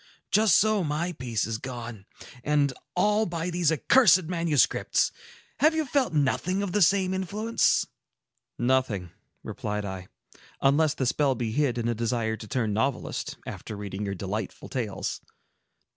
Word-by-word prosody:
Just 215 Hz, 0 st, +5 dB
so 215 Hz, -2 st, +3 dB
my 155 Hz, +3 st, -1 dB
peace 125 Hz, -, -2 dB
is 110 Hz, 0 st, -3 dB
gone, 120 Hz, -5 st, -7 dB, 0.4 s
and 145 Hz, -2 st, +2 dB, 0.2 s
all 210 Hz, +4 st, +2 dB
by 170 Hz, 0 st, -3 dB
these 170 Hz, -2 st, +2 dB
accursed 185 Hz, -, +5 dB
manuscripts. 160 Hz, -7 st, +1 dB, 0.5 s
Have 310 Hz, +4 st, +4 dB
you 315 Hz, -1 st, 0 dB
felt 265 Hz, -5 st, +1 dB
nothing 165 Hz, +6 st, 0 dB
of 195 Hz, -, -3 dB
the 210 Hz, -, +1 dB
same 190 Hz, +1 st, +3 dB
influence?" 205 Hz, +5 st, +1 dB, 0.7 s
"Nothing," 120 Hz, -8 st, 0 dB, 0.3 s
replied 105 Hz, 0 st, -4 dB
I, 95 Hz, -1 st, -6 dB, 0.5 s
"unless 145 Hz, +2 st, +3 dB
the 130 Hz, -, -1 dB
spell 135 Hz, +1 st, +2 dB
be 115 Hz, -2 st, -3 dB
hid 130 Hz, -1 st, +1 dB
in 120 Hz, -1 st, -1 dB
a 120 Hz, -, +1 dB
desire 115 Hz, -1 st, -1 dB
to 110 Hz, -, -10 dB
turn 110 Hz, -3 st, -1 dB
novelist, 125 Hz, +5 st, -2 dB
after 105 Hz, -, -7 dB
reading 100 Hz, 0 st, -5 dB
your 100 Hz, 0 st, -3 dB
delightful 100 Hz, +2 st, -5 dB
tales." 110 Hz, -7 st, -3 dB
140 Hz, 145 wpm, -27 LUFS, 110-180 Hz, 0.7 s, Just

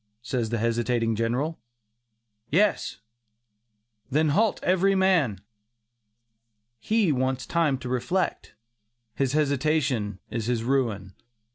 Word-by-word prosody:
says 120 Hz, -3 st, -2 dB
the 120 Hz, -, -1 dB
hesitating 115 Hz, 0 st, 0 dB
General. 125 Hz, +8 st, -1 dB, 0.9 s
"Yes." 180 Hz, -, +1 dB, 1.1 s
"Then 155 Hz, +3 st, +2 dB
halt 210 Hz, +8 st, +2 dB
every 190 Hz, +2 st, +3 dB
man." 180 Hz, -, +2 dB, 1.4 s
He 215 Hz, -, +2 dB
wants 130 Hz, -1 st, -1 dB
time 160 Hz, -5 st, +1 dB
to 130 Hz, -, -8 dB
reflect; 130 Hz, -, -2 dB, 0.6 s
his 135 Hz, +4 st, -1 dB
hesitation 140 Hz, -7 st, +1 dB
is 115 Hz, -2 st, -3 dB
his 120 Hz, -2 st, 0 dB
ruin. 115 Hz, -7 st, -1 dB
130 Hz, 100 wpm, -26 LUFS, 115-160 Hz, 1.4 s, every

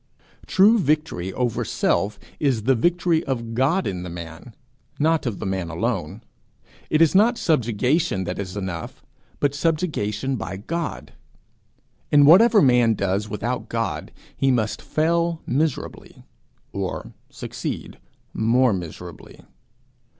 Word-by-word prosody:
True 210 Hz, +4 st, +5 dB
victory 150 Hz, -, 0 dB
over 125 Hz, -3 st, -1 dB
self 100 Hz, +5 st, 0 dB, 0.2 s
is 130 Hz, -7 st, +1 dB
the 135 Hz, +4 st, +4 dB
victory 170 Hz, +5 st, +1 dB
of 115 Hz, -4 st, -3 dB
God 140 Hz, +10 st, +1 dB
in 90 Hz, -2 st, -3 dB
the 90 Hz, -, -6 dB
man, 85 Hz, +6 st, -9 dB, 0.4 s
not 160 Hz, -2 st, +1 dB
of 110 Hz, -5 st, -3 dB
the -, -, -6 dB
man 95 Hz, -3 st, -2 dB
alone. 80 Hz, -, -3 dB, 0.7 s
It 155 Hz, +2 st, +4 dB
is 160 Hz, -, +3 dB
not 225 Hz, +5 st, +4 dB
subjugation 125 Hz, -, +1 dB
that 90 Hz, +2 st, -4 dB
is 100 Hz, 0 st, -5 dB
enough, 95 Hz, -4 st, -6 dB, 0.4 s
but 145 Hz, -1 st, +1 dB
subjugation 140 Hz, -, -1 dB
by 95 Hz, -2 st, -5 dB
God. 110 Hz, -, -5 dB, 1.0 s
In 145 Hz, -1 st, +6 dB
whatever 210 Hz, +7 st, +7 dB
man 120 Hz, -4 st, +4 dB
does 100 Hz, +2 st, -1 dB
without 120 Hz, +5 st, -3 dB
God, 115 Hz, 0 st, -3 dB, 0.2 s
he 135 Hz, -, +1 dB
must 115 Hz, -5 st, 0 dB
fail 170 Hz, +1 st, 0 dB
miserably 150 Hz, +1 st, -3 dB, 0.5 s
or -, -, -4 dB, 0.2 s
succeed -, -, -6 dB, 0.3 s
more 120 Hz, +2 st, +3 dB
miserably. 90 Hz, -1 st, -8 dB
125 Hz, 125 wpm, -23 LUFS, 100-160 Hz, 1.0 s, whatever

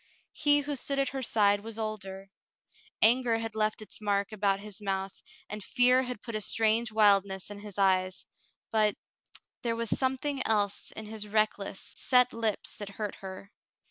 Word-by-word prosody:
He 290 Hz, 0 st, +3 dB
who 290 Hz, 0 st, -3 dB
stood 275 Hz, +2 st, 0 dB
at 275 Hz, -1 st, +1 dB
her 270 Hz, 0 st, -4 dB
side 205 Hz, -4 st, +3 dB
was 225 Hz, +1 st, -6 dB
older. 195 Hz, -3 st, -5 dB, 0.7 s
Anger 235 Hz, 0 st, +4 dB
had 225 Hz, -1 st, -4 dB
left 215 Hz, 0 st, 0 dB
its 215 Hz, -, -9 dB
mark 200 Hz, -1 st, 0 dB
about 200 Hz, -2 st, +1 dB
his 210 Hz, 0 st, -8 dB
mouth, 195 Hz, -1 st, -3 dB, 0.3 s
and 210 Hz, 0 st, -6 dB
fear 250 Hz, +3 st, +4 dB
had 250 Hz, -4 st, -5 dB
put 230 Hz, -, -6 dB
a 215 Hz, -, -2 dB
strange 225 Hz, +2 st, +1 dB
wildness 200 Hz, -2 st, +3 dB
in 205 Hz, -, -7 dB
his 205 Hz, -2 st, -10 dB
eyes 185 Hz, -1 st, +2 dB, 0.2 s
— -, -, -42 dB
but 215 Hz, -2 st, +3 dB, 0.3 s
— -, -, -13 dB
there 230 Hz, -1 st, -1 dB
was 230 Hz, -1 st, -2 dB
something 265 Hz, +1 st, 0 dB
else 205 Hz, -2 st, 0 dB
in 220 Hz, -, -7 dB
his 210 Hz, -1 st, -5 dB
reckless, 210 Hz, -2 st, -1 dB
set 250 Hz, -1 st, +4 dB
lips 225 Hz, -3 st, -1 dB
that 205 Hz, -1 st, -5 dB
hurt 205 Hz, 0 st, -4 dB
her. 190 Hz, +1 st, -9 dB
215 Hz, 175 wpm, -29 LUFS, 200-230 Hz, 0.7 s, Anger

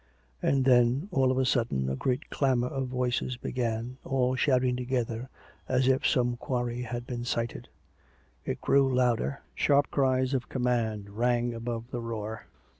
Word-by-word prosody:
And 135 Hz, -1 st, +2 dB
then, 125 Hz, +6 st, +4 dB
all 130 Hz, -1 st, +3 dB
on 130 Hz, -, 0 dB
a 130 Hz, -, +2 dB
sudden, 115 Hz, -, +1 dB
a 65 Hz, -, -1 dB
great 130 Hz, -, -2 dB
clamour 125 Hz, -3 st, +1 dB
of 135 Hz, -1 st, -2 dB
voices 125 Hz, 0 st, -1 dB
began, 120 Hz, 0 st, -3 dB
all 130 Hz, -1 st, +1 dB
shouting 130 Hz, -2 st, +2 dB
together, 125 Hz, -1 st, -2 dB, 0.4 s
as 130 Hz, 0 st, +2 dB
if 130 Hz, +1 st, +3 dB
some 120 Hz, -1 st, +1 dB
quarry 120 Hz, -1 st, -2 dB
had 120 Hz, 0 st, -4 dB
been 120 Hz, -1 st, -4 dB
sighted: 115 Hz, -1 st, -3 dB, 0.8 s
it -, -, -4 dB
grew 135 Hz, -1 st, +3 dB
louder, 125 Hz, +1 st, +1 dB
sharp 145 Hz, 0 st, +2 dB
cries 130 Hz, -1 st, +2 dB
of 130 Hz, -2 st, -1 dB
command 115 Hz, -5 st, -1 dB
rang 120 Hz, +2 st, +1 dB
above 115 Hz, +1 st, -5 dB
the 120 Hz, -, -3 dB
roar. 110 Hz, -1 st, -5 dB
125 Hz, 155 wpm, -29 LUFS, 120-130 Hz, 0.8 s, then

